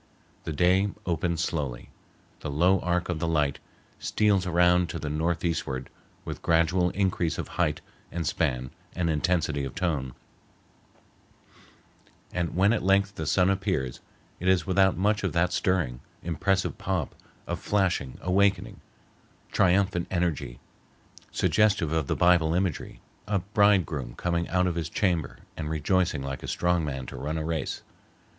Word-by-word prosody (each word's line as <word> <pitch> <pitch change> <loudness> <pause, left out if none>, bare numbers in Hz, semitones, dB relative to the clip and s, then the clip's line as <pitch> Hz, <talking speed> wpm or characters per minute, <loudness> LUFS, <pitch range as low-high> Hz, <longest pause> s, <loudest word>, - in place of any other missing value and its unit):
The - - -3
day 90 +5 +3 0.2
opens 85 -1 0
slowly. 70 -7 -3 0.5
The - - -5
low 90 +7 +3
arc 90 0 0
of 85 -3 -3
light 75 -4 +1 0.4
steals 100 -4 +1
around 90 0 +3
to - - -4
the 75 -2 -4
northeastward 80 -4 -1 0.3
with - - -6
gradual 85 +2 +3
increase 90 -4 0
of - - -4
height - - 0 0.3
and 85 -1 -3
span 65 -2 -1 0.2
and 85 -2 0
intensity 80 -2 0
of 65 - -5
tone; 75 -9 -2 2.2
and 85 -2 -2
when 100 +4 +4
at 115 - 0
length 100 +1 +2
the 80 -6 -5
sun 90 +4 +3
appears, 95 - -1 0.4
it 90 - -3
is 95 -4 +3
without 95 -1 +3
much 105 +3 +1
of 95 -6 -1
that 85 +2 +2
stirring, 85 -10 0 0.2
impressive 95 +3 0
pomp, - - -2 0.3
of - - -3
flashing, 95 -10 0
awakening, 95 +1 +1 0.7
triumphant 95 -1 +2
energy, 85 -9 -2 0.7
suggestive 105 -8 +2
of 80 -4 0
the - - 0
Bible 85 -2 +4
imagery, 90 -3 -2 0.3
a 105 -1 +1
bridegroom 95 - +1
coming 85 -1 -1
out 90 0 +2
of 90 - 0
his 80 -2 -3
chamber 85 -6 0 0.2
and 75 -1 -4
rejoicing 80 -1 +1
like 70 -1 -5
a - - -7
strong 90 -1 +1
man 65 -3 -4
to - - -8
run 75 +3 -3
a 80 - -3
race. 80 -4 -3
85 Hz, 145 wpm, -27 LUFS, 80-95 Hz, 2.2 s, when